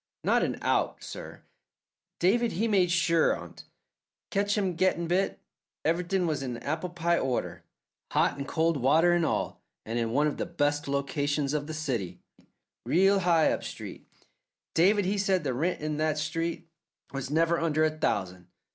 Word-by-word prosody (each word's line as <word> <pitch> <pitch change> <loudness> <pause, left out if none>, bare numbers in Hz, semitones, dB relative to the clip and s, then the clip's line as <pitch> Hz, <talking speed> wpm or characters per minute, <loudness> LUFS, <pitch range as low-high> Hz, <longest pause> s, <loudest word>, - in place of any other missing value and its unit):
"Not - - +3
an - - -1
out, - - 0
sir. - - -9 0.7
David 230 +6 +2
he 220 +7 0
made 190 -5 +3
sure 170 -1 +3
on't. - - -11 0.7
Catch 205 +1 +1
him 190 -3 0
gettin' 170 -1 +1
bit. 180 +3 0 0.5
Everythin' 180 +3 +1
was 155 -4 -1
in 125 -3 -4
apple 155 +8 -3
pie 170 0 +1
order, 130 -2 -2 0.5
hot - - +2
an' 140 - -5
cold 165 +1 +1
water 155 +7 +4
and 175 -1 +2
all, - - -1 0.2
and 115 +2 -2
in 115 -1 0
one 145 +6 +2
of 150 - -1
the - - -3
best 145 -3 0
locations 140 +1 -1
of 150 -1 -2
the 155 - -5
city 125 - -3 0.6
real 195 +3 +4
high 170 -3 +3
up - - -2
street. - - -8 0.7
David 195 +4 +4
he 200 +2 0
said 190 -3 +1
the 135 -3 -1
rent 165 +8 -1
in 150 0 -2
that 155 0 0
street 165 +3 -3 0.5
was 135 -1 -4
never 165 +3 +2
under 155 -1 +1
a 155 - +3
thousand. 95 - -2
160 Hz, 165 wpm, -28 LUFS, 145-180 Hz, 0.7 s, water